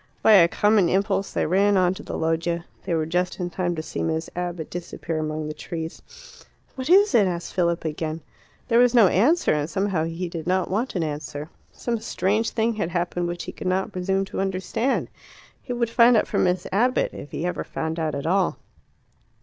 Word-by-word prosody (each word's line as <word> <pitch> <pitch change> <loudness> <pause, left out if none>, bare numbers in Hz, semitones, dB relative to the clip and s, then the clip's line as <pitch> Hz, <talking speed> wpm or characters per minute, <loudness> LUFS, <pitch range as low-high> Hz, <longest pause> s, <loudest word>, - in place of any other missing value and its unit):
By - - +6
a 185 -5 +8
common 205 -1 +3
impulse 195 +1 0
they - - 0
ran 200 +4 +3
on 180 -1 +3
to 200 - -9
the - - -5
loggia. 165 +1 -1 0.2
They 170 - 0
were 160 -1 0
just 180 +4 -1
in 175 -1 -3
time 175 -1 -1
to 160 - -4
see 155 - -5
Miss 160 0 -2
Abbott 175 -2 -4
disappear 170 -2 -4
among 155 0 -3
the 155 - -4
trees. 160 0 -6 0.7
"What 260 +2 -5
is 400 +3 +6
it?" 210 -5 +5
asked 175 -1 -4
Philip 170 -2 0
again. 155 +1 -3 0.5
There 235 -1 +4
was 245 0 +4
no 230 -4 +8
answer, 280 - +3
and 150 0 -1
somehow 190 -4 0
he 165 +2 -4
did 165 -1 -6
not 185 0 +1
want 225 +6 -1
an 175 - 0
answer. 150 0 -5 0.2
Some 235 -2 -3
strange 215 +2 0
thing 230 +1 0
had 170 - -1
happened 175 0 -1
which 175 0 -4
he - - -6
could - - -6
not 190 +2 0
presume 195 +1 -1
to 190 - -4
understand. 195 +7 -1 0.5
He - - -8
would 240 -1 0
find 235 0 +6
out - - +3
from - - +1
Miss 180 0 0
Abbott, 245 +6 +1
if 145 - -9
ever 175 +2 -2
he - - -9
found 160 +1 -3
out 155 -2 -1
at 140 - -4
all. 185 +2 +1
180 Hz, 205 wpm, -24 LUFS, 165-205 Hz, 0.7 s, a